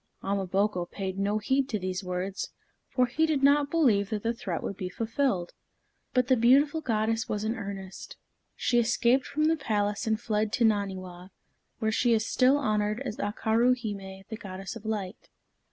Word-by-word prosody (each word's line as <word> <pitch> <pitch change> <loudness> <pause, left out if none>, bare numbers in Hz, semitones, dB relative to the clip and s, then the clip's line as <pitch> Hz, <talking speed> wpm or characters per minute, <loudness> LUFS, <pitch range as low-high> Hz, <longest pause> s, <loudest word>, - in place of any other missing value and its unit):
Ama 195 -1 -1
boko 190 -1 0
paid 190 0 -5
no 205 +2 +1
heed 265 +5 +1
to 215 - 0
these 185 0 -3
words, 180 +1 -3 0.4
for 255 - +2
he 305 +6 +1
did 295 -4 0
not 285 +1 +5
believe 235 -12 +3
that 215 -2 -3
the 230 +1 +1
threat 185 -7 -4
would 200 - -3
be 185 -2 -4
fulfilled. 225 -3 -1 0.6
But 250 -1 +2
the 260 - +5
beautiful 275 +6 +4
goddess 225 -3 0
was 210 0 -2
in 220 +1 0
earnest. 195 -4 -7 0.4
She 240 - +2
escaped 240 +3 +2
from 305 - -1
the 320 +1 +4
palace 210 -5 -1
and 220 -1 +1
fled 215 -2 -1
to 235 - +3
Naniwa, 190 -4 -1 0.5
where 220 -1 0
she 235 +2 +3
is 220 0 +1
still 260 +4 +4
honored 215 -4 0
as 245 -6 -4
Akaru 225 +4 +2
hime, 195 -4 -6
the 220 - -6
Goddess 195 0 -7
of 230 -1 -10
Light. 205 -3 -4
215 Hz, 180 wpm, -28 LUFS, 195-250 Hz, 0.6 s, not